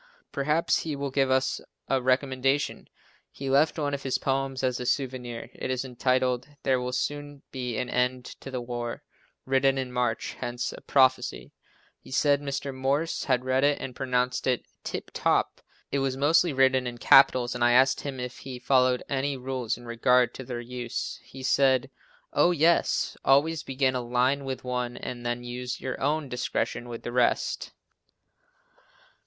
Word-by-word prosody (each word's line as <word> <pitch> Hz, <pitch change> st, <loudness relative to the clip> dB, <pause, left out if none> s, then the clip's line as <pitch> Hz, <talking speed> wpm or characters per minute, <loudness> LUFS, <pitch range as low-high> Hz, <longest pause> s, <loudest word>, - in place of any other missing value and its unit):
Perhaps 150 Hz, +3 st, +1 dB
he 155 Hz, -3 st, -3 dB
will 140 Hz, -1 st, -3 dB
give 135 Hz, 0 st, +2 dB
us 130 Hz, 0 st, +1 dB, 0.3 s
a 135 Hz, -1 st, +1 dB
recommendation! 130 Hz, +2 st, 0 dB, 0.4 s
He 135 Hz, -1 st, -5 dB
left 145 Hz, +5 st, +3 dB
one 145 Hz, -2 st, -1 dB
of 140 Hz, -, -2 dB
his 135 Hz, -1 st, 0 dB
poems 135 Hz, -1 st, -1 dB
as 125 Hz, -1 st, 0 dB
a 125 Hz, -, -4 dB
souvenir. 125 Hz, -4 st, -2 dB
It -, -, -5 dB
is 130 Hz, 0 st, -1 dB
entitled, 125 Hz, 0 st, 0 dB, 0.2 s
"There 130 Hz, -1 st, +2 dB
will 125 Hz, 0 st, -3 dB
soon 145 Hz, +2 st, -3 dB
be 125 Hz, -4 st, -3 dB
an 125 Hz, -, -1 dB
end 125 Hz, 0 st, 0 dB
to -, -, -9 dB
the 130 Hz, -2 st, -3 dB
war," 120 Hz, -1 st, -5 dB, 0.4 s
written 135 Hz, 0 st, +2 dB
in 130 Hz, -1 st, -3 dB
March, 125 Hz, -2 st, -1 dB
hence 120 Hz, 0 st, -3 dB
a -, -, -10 dB
prophecy. 130 Hz, -2 st, +2 dB, 0.5 s
He -, -, -16 dB
said 145 Hz, +1 st, +2 dB
Mr. 140 Hz, -1 st, -3 dB
Morse 140 Hz, +5 st, -1 dB
had 130 Hz, -2 st, +1 dB
read 130 Hz, +1 st, +2 dB
it 145 Hz, 0 st, +3 dB
and 130 Hz, -2 st, -6 dB
pronounced 125 Hz, -1 st, 0 dB
it 125 Hz, -2 st, +1 dB, 0.2 s
"tip -, -, -5 dB
top." -, -, +1 dB, 0.3 s
It 140 Hz, -, +1 dB
was 135 Hz, -1 st, -1 dB
mostly 155 Hz, +4 st, +4 dB
written 130 Hz, -1 st, +3 dB
in 120 Hz, 0 st, -5 dB
capitals 125 Hz, -1 st, +5 dB
and 125 Hz, -1 st, -1 dB
I 120 Hz, 0 st, +5 dB
asked 130 Hz, +1 st, +4 dB
him 135 Hz, -2 st, -5 dB
if 125 Hz, 0 st, -6 dB
he 130 Hz, -2 st, -7 dB
followed 125 Hz, 0 st, +2 dB
any 140 Hz, 0 st, -1 dB
rule 130 Hz, -2 st, -4 dB
in 120 Hz, -, -13 dB
regard 120 Hz, +1 st, +3 dB
to 130 Hz, -, -7 dB
their 120 Hz, -1 st, -5 dB
use. 120 Hz, 0 st, -5 dB
He 135 Hz, 0 st, -11 dB
said 135 Hz, 0 st, +3 dB, 0.4 s
"Oh, -, -, +4 dB
yes, 170 Hz, 0 st, +2 dB
always 145 Hz, +4 st, +3 dB
begin 130 Hz, 0 st, 0 dB
a 125 Hz, -, -1 dB
line 125 Hz, +3 st, +1 dB
with 130 Hz, -1 st, -4 dB
one 125 Hz, -1 st, -3 dB
and 120 Hz, -1 st, -6 dB
then 120 Hz, 0 st, -2 dB
use 125 Hz, +1 st, -5 dB
your 130 Hz, -, -5 dB
own 150 Hz, +1 st, 0 dB
discretion 125 Hz, -1 st, -2 dB
with 115 Hz, -1 st, -7 dB
the 120 Hz, -, -4 dB
rest." 125 Hz, -1 st, +1 dB
130 Hz, 175 wpm, -27 LUFS, 125-135 Hz, 0.5 s, capitals